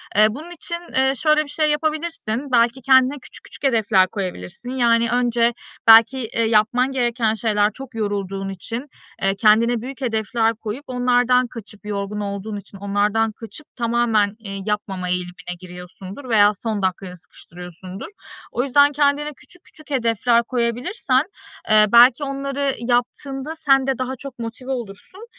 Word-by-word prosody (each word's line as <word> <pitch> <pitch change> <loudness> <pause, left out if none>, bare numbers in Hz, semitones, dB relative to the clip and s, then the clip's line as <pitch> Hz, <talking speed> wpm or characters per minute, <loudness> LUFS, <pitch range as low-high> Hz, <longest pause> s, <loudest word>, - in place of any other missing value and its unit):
Eee, 215 +1 +6
bunun 300 +10 -8
için, 340 0 -5 0.2
eee, 265 +1 +3
şöyle 305 +4 +2
bir 285 - -13
şey 305 +1 +1
yapabilirsin: 300 -5 -2
Belki 240 +2 +3
kendine 260 +2 +4
küçük - - -11
küçük - - -10
hedefler 220 -7 +3
koyabilirsin. 190 +3 -6
Yani 235 -2 +2
önce 240 -1 +2 0.3
belki, 225 +4 +7
eee, 230 +1 -1
yapman 230 +4 +2
gereken 240 -3 0
şeyler 210 -1 +1
Çok 265 -1 -10
yorulduğun 195 -2 -3
için, 230 +8 -6 0.3
eee, 195 0 +1
kendine 225 +3 +3
büyük 260 +2 -8
hedefler 225 -1 0
koyup 225 +5 -6
onlardan 250 0 +2
kaçıp- 210 -3 -11
yorgun 205 0 -4
olduğun 205 +1 -4
için 200 0 -11
onlardan 205 +3 0
kaçıp- 230 +7 -10
tamamen, 230 -3 +1
eee, 195 -3 -7
yapmama 200 -3 -3
eğilimine 180 0 -3
giriyorsundur 185 +7 -10
veya 210 -2 +5
son 210 0 -4
dakikaya 185 0 -2
sıkıştırıyorsundur. 180 +2 -11 0.5
O 245 - -1
yüzden 285 +2 +4
kendine 290 +1 +1
küçük 360 - -15
küçük 310 -1 -15
hedefler 235 -2 +2
koyabilirsen, 255 - 0 0.5
eee, 215 0 +6
belki 245 +4 +7
onları 275 0 -2
yaptığında 265 +5 -2
sen 270 -4 +2
de 265 - 0
daha 255 0 -3
çok 270 0 -10
motive 235 +3 -6
olursun. 245 - -7
235 Hz, 145 wpm, -21 LUFS, 210-265 Hz, 0.5 s, belki